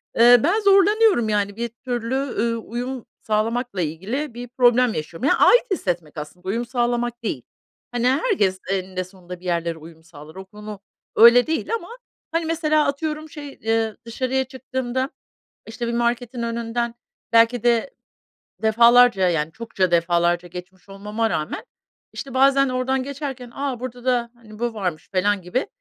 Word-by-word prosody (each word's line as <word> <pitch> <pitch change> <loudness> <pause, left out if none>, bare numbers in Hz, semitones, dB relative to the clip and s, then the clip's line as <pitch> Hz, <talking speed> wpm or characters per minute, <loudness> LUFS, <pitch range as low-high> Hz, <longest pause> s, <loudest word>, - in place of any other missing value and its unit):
eee, 240 +1 +7
ben 360 +8 +3
zorlanıyorum, 400 - +4
yani, 205 -1 0
bir 235 +1 -2
türlü, 240 +1 -4
ııı, 235 -4 -1
uyum 245 +2 -5 0.2
sağlamakla 220 -1 -1
ilgili 210 - -3
bir 245 +1 -7
problem 245 -1 +3
yaşıyorum. 165 - -3
Yani, - - +3
ait - - +5
hissetmek 175 - -2
aslında, 180 +5 -8
uyum 230 +5 -1
sağlamak 240 -1 -1
değil. 135 - -3 0.5
Hani, 245 0 0
herkes 260 - +1
eninde 185 -1 -2
sonunda 180 -1 -11
bir 180 - -16
yerlere 170 -2 -1
uyum 160 0 -14
sağlar. 155 -1 -14
O 190 - -8
konu 210 +1 -10 0.4
öyle 240 +4 +7
değil 320 +7 -2
ama 395 -6 -6 0.4
Hani, 330 0 0
mesela 310 -2 +1
atıyorum, 305 +2 -3
şey, 290 -2 -9
eee, 225 -1 0
dışarıya 260 +3 -1
çıktığımda, 260 0 -3 0.6
işte, 235 +1 -5
bir 235 - -2
marketin 240 +1 -1
önünden 235 0 -2 0.4
belki 230 +1 +4
de 240 +2 +2 0.7
defalarca, 235 -3 +5
yani, 160 -2 -1
çokça 210 -4 -2
defalarca 175 +1 +2
geçmiş 180 +2 -11
olmama 210 +3 -2
rağmen, 155 -2 -3 0.5
işte, 270 -2 -7
bazen 275 +1 +4
oradan 255 +1 0
geçerken, 270 -2 -6
"A, 275 -4 -3
burada 250 -1 -7
da, 240 -2 +1
hani, 220 -3 -15
bu 235 0 -2
varmış." 180 -7 -4
falan 195 +1 +1
gibi 180 +10 -2
235 Hz, 150 wpm, -22 LUFS, 195-260 Hz, 0.7 s, eee